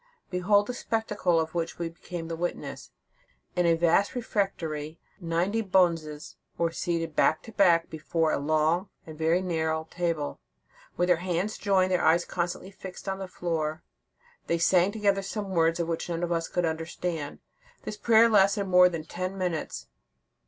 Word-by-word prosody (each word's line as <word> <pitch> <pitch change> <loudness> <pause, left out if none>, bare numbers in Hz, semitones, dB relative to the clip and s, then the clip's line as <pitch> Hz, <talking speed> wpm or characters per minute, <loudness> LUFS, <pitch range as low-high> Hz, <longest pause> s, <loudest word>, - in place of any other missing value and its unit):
Behold 200 +3 +3
the 250 - -4
spectacle 210 -7 0
of 160 0 -2
which 170 -1 -2
we 170 - -2
became 165 0 -7
the 165 - -3
witnesses. 175 +2 -4 0.7
In 175 -1 +2
a 165 - +5
vast 170 +6 +2
refectory, 165 -9 -2 0.2
ninety 175 +5 0
bonzes 165 -6 +1 0.2
were 170 -1 +1
seated 165 -2 -2
back 155 - +3
to 225 - -10
back, 175 -5 +4
before 160 0 -1
a - - 0
long 155 +5 +1 0.2
and 155 - -9
very 165 +4 +1
narrow 160 -2 -1
table; 170 -4 -2 0.6
with 175 - +3
their 180 -2 +4
hands 180 +4 -2
joined, 190 -2 +2
their 180 - +2
eyes 170 +2 +4
constantly 175 +2 -3
fixed 190 0 -10
on 195 0 -2
the 190 - -5
floor, 160 -3 -3 0.6
they 170 - +1
sang 180 +2 +3
together 200 -2 +1
some 195 0 -5
words 165 -1 +2
which 170 0 -2
none 170 0 -2
of 175 - -1
us 165 -1 0
could 175 -1 0
understand. 160 -1 -3 0.5
This - - -5
prayer 225 +2 +5
lasted 200 -2 +4
more 180 -1 +6
than 165 -3 -5
ten 185 +4 -5
minutes. 175 - -3
175 Hz, 165 wpm, -27 LUFS, 165-190 Hz, 0.7 s, more